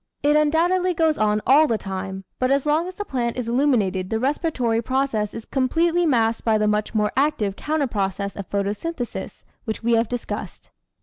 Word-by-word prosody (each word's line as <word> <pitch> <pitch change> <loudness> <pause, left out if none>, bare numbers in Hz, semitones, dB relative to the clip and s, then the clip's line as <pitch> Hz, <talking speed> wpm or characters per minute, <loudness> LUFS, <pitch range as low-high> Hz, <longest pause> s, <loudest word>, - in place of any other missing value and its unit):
It 295 +1 +4
undoubtedly 345 +4 +2
goes 320 -2 +2
on 210 0 +1
all 295 +5 +6
the 230 - +1
time, 190 -1 -5 0.2
but 255 - +1
as 275 +1 +2
long 310 +4 +1
as 370 - -8
the 415 - -5
plant 240 - -2
is 245 -2 -3
illuminated 230 -8 +1
the 220 - 0
respiratory 255 -4 0
process 245 -4 -1
is 225 - -8
completely 330 +6 +1
masked 230 -5 +1
by 220 -2 +3
the 210 0 +1
much 210 +1 -1
more 210 -1 +2
active 260 -9 +1
counter 305 +3 -1
process 200 -4 -2
of 200 - -7
photosynthesis 210 +8 -4 0.2
which 220 -1 -4
we 235 - +1
have 230 -1 +2
discussed. 245 -1 -6
240 Hz, 185 wpm, -23 LUFS, 210-300 Hz, 0.2 s, all